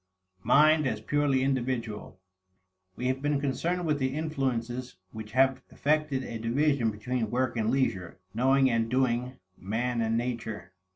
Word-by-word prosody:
Mind 155 +5 +5
as 110 -4 -2
Purely 140 +2 +1
Individual. 120 -7 -2 0.8
We 125 - -5
have 130 +1 0
been 145 0 +1
concerned 170 +6 -1
with 150 -2 +1
the 130 0 -1
influences 130 -5 -2 0.2
which 110 -1 -9
have 130 0 +3
effected 150 -2 0
a 115 -2 -6
division 125 +1 +1
between 110 +2 -2
work 125 +1 0
and 110 -1 0
leisure, 115 -9 -1 0.2
knowing 135 +4 +3
and 115 -2 +1
doing, 125 0 0 0.2
man 115 +5 -1
and 115 0 +1
nature. 115 -5 -4
130 Hz, 140 wpm, -28 LUFS, 115-135 Hz, 0.8 s, Mind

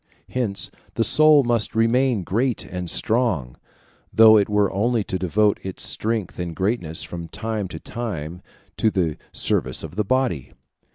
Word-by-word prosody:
Hence 115 -6 -2 0.2
the 115 - +2
soul 155 +4 +6
must 120 -3 0
remain 115 -1 +2
great 120 +7 -1
and 90 -1 -5
strong, 100 - 0 0.6
though 110 -1 +7
it 105 -1 +3
were 105 -1 +2
only 115 +2 +1
to 95 -1 -4
devote 100 +3 +1
its 95 -1 -5
strength 110 -5 -2
and 85 -2 -4
greatness 95 -5 -1
from 85 -1 -7
time 110 +1 -4
to 80 -2 -8
time 90 -9 -6 0.4
to 110 - +3
the 85 -7 -1
service 65 - 0
of 90 - -9
the 105 - +2
body. 120 - -1
105 Hz, 155 wpm, -22 LUFS, 90-115 Hz, 0.6 s, though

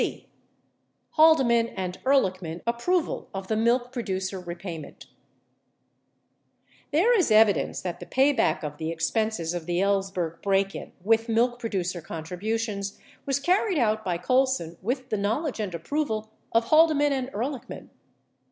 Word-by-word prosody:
85 - - -1
c. - - -32 0.8
Haldeman 265 -8 +5
and 185 -1 -4
Ehrlichman 185 -11 +1
Approved 305 +10 0
of 190 0 -5
the 220 - +1
Milk 240 +3 +1
Producer 190 -6 -3
Re 175 -1 -6
payment 170 -4 -8 1.9
There 385 +12 +4
is 370 - +2
evidence 215 -2 +4
that 180 -2 -4
the - - -9
payback 270 - +2
of 150 -1 -5
the 160 +1 -3
expenses 170 +1 -1
of 175 -2 -5
the 175 0 0
Ellsberg 190 -4 -1
break 195 0 +1
in - - -8
with 225 +2 +2
milk 240 +2 +2
producer 185 -7 -2
contributions 200 +6 -4 0.3
was 275 0 +1
carried 365 +4 +2
out 220 -4 +1
by 180 -3 -1
Colson 255 -4 +1
with 255 +6 -3
the 215 - 0
knowledge 230 +8 -1
and 200 -5 -3
approval 220 - -2 0.2
of 230 0 +3
Haldeman 310 -2 +5
and 260 -2 -2
Ehrlichman. 255 +2 -5
220 Hz, 145 wpm, -26 LUFS, 185-260 Hz, 1.9 s, Haldeman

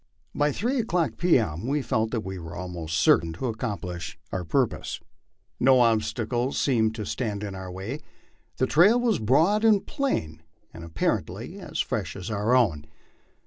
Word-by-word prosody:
By 145 0 +2
three 245 - -1
o'clock 180 -7 0
p. 175 -4 +4
M. 100 -2 -2
we 145 +1 0
felt 110 -2 0
that 115 -1 -2
we 95 -1 -5
were 85 +1 -8
almost 85 -3 -4
certain 80 +1 +4
to 105 - -5
accomplish 90 -9 -4
our 95 - -2
purpose. 80 - -1 0.6
No 130 0 +5
ob 115 -2 +4
stacle 120 +4 -2
seemed 110 -5 +1
to 110 -2 -4
stand 105 -2 -3
in 100 -2 -4
our 95 -1 -7
way; 100 +10 -5 0.6
the 130 - +2
trail 190 - +5
was 230 -7 +1
broad 160 - +3
and 215 -3 +4
plain, 80 - -2 0.3
and 85 - -9
appar 85 -1 0
ently - - -9
as - - -3
fresh - - -3
as 95 +3 -6
our 105 +4 +2
own. 85 -12 +2
110 Hz, 175 wpm, -26 LUFS, 90-140 Hz, 0.6 s, No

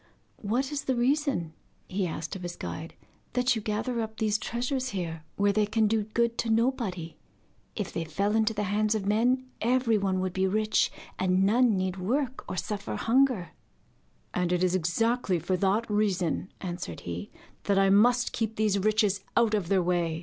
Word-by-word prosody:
'What 245 +7 -1
is 290 -1 -3
the 260 - +1
reason,' 255 - +1 0.3
he 190 0 -1
asked 160 +1 -5
of 190 - -7
his 175 -1 -5
guide, 160 +1 -6 0.4
'that 250 0 +2
you 220 - -2
gather 220 +3 -2
up 220 0 -5
these 215 -1 +1
treasures 250 +4 -2
here, 165 -3 -4
where 200 0 +2
they 210 0 +2
can 220 +1 +2
do 215 0 +1
good 235 +2 0
to 230 - 0
nobody? 220 -8 0 0.6
If - - -4
they 165 - -2
fell 200 +7 -1
into 220 0 +3
the 210 - -1
hands 210 +2 +1
of 205 -3 -2
men, 245 +5 +2 0.2
everyone 225 -6 +2
would 185 -1 -2
be 190 +1 +1
rich, 215 +2 +2 0.3
and 185 0 +2
none 225 +1 +4
need 185 0 -1
work 255 +7 -1
or 185 - -4
suffer 205 +1 -3
hunger.' 240 -7 +2 0.8
'And 180 -1 0
it 180 0 +1
is 180 -1 +2
exactly 185 +4 +1
for 175 +3 -1
that 200 +4 +1
reason,' 195 -4 0
answered 175 - -5
he, 85 +3 -5 0.4
'that 200 -1 +2
I 195 0 +4
must 245 +4 +4
keep 225 -1 -2
these 210 -2 +2
riches 210 -1 +2
out 230 -2 +4
of 205 -5 0
their 190 -1 +2
way. 170 -2 0
210 Hz, 180 wpm, -28 LUFS, 185-230 Hz, 0.8 s, none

